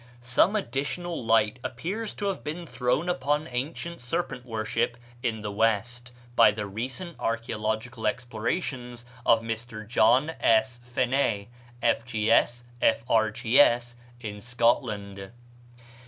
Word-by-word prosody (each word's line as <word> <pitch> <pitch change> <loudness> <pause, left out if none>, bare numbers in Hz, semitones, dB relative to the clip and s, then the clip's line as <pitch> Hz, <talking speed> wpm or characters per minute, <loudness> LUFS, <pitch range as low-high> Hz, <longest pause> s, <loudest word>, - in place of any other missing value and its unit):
Some 125 - +3
additional 155 - -2
light 115 0 +3
appears 195 - -4
to 205 - -4
have 195 - -4
been 170 +3 -5
thrown 125 +4 0
upon 150 -2 0
ancient 155 +6 -4
serpent 125 -1 -3
worship 115 +1 -1 0.2
in 110 -3 -2
the 105 - -3
West 115 +3 0 0.2
by - - +8
the 105 0 -3
recent 130 - -5
archæological 110 0 -1
explorations 120 +1 -3 0.2
of 115 0 +5
Mr. 115 -1 -5
John 125 +6 +4
S. 120 +2 +3
Phené, 120 -3 0 0.3
F.G.S., 115 +1 +2 0.2
F.R.G.S., 120 +2 +3 0.3
in 105 -3 -6
Scotland. 105 -5 0
120 Hz, 110 wpm, -27 LUFS, 110-130 Hz, 0.3 s, by